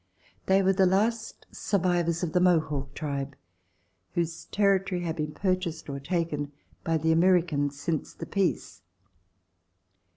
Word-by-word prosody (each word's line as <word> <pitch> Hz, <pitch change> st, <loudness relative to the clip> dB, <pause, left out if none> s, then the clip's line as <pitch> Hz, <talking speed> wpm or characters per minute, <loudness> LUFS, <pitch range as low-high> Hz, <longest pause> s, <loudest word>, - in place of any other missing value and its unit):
They 195 Hz, +1 st, +4 dB
were 190 Hz, +1 st, +4 dB
the 190 Hz, 0 st, +4 dB
last 220 Hz, +5 st, 0 dB
survivors 175 Hz, -3 st, 0 dB
of 165 Hz, -, -2 dB
the 180 Hz, -, +4 dB
Mohawk 155 Hz, -6 st, +1 dB
tribe 140 Hz, -2 st, -3 dB, 0.8 s
whose 170 Hz, -1 st, -2 dB
territory 195 Hz, -3 st, +1 dB
had 165 Hz, -2 st, -2 dB
been 150 Hz, -1 st, -2 dB
purchased 185 Hz, -2 st, -2 dB
or 140 Hz, -, -4 dB
taken 150 Hz, -2 st, -2 dB, 0.3 s
by 165 Hz, -1 st, +1 dB
the 160 Hz, +1 st, +1 dB
Americans 165 Hz, -5 st, +2 dB
since 155 Hz, 0 st, -2 dB
the -, -, -6 dB
peace. 175 Hz, -, -1 dB
170 Hz, 130 wpm, -27 LUFS, 150-185 Hz, 0.8 s, They